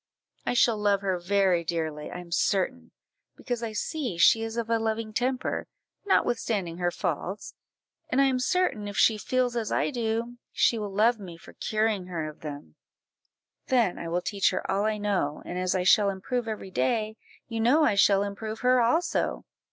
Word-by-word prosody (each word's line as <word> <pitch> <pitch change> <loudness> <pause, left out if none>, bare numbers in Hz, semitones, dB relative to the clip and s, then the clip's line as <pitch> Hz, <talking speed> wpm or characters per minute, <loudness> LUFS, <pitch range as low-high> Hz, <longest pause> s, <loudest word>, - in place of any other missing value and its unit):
I - - +1
shall 235 -3 +3
love 205 -1 +2
her 190 -2 -1
very 185 -1 +2
dearly, 160 -2 -3
I - - -7
am 175 -1 -10
certain, 215 +8 0 0.5
because 245 -2 -4
I 225 -2 -4
see 245 - -3
she 225 +6 +5
is 225 +1 -4
of 230 -1 -1
a 230 0 +1
loving 220 0 -2
temper, 255 +3 -1 0.4
notwithstanding 205 - 0
her 175 -1 +1
faults; 190 +3 -4 0.6
and 255 - +1
I - - +6
am 260 -1 +1
certain, 255 - 0
if 205 - -6
she 220 -2 +4
feels 250 +1 0
as 225 -3 -2
I - - +1
do, 235 -1 -2
she 230 - +2
will 210 -1 -3
love 220 +4 +3
me 175 -4 -9
for - - -15
curing 215 -4 -1
her 165 -4 -3
of 155 - -10
them; 145 - -8 0.9
then 235 -8 +2
I 170 - -5
will 175 +2 -1
teach 200 -2 +1
her 185 - -3
all 200 +2 +1
I 215 0 0
know, 195 -8 -1
and 180 - -4
as 185 0 0
I 185 - +1
shall 200 +2 +5
improve 225 +5 -3
every 210 -3 -5
day, 215 - 0 0.3
you 230 -1 -4
know 255 +8 +4
I 225 - +4
shall 200 0 +4
improve 215 +2 -5
her 250 0 +4
also! 315 +10 0
215 Hz, 190 wpm, -27 LUFS, 185-235 Hz, 0.9 s, I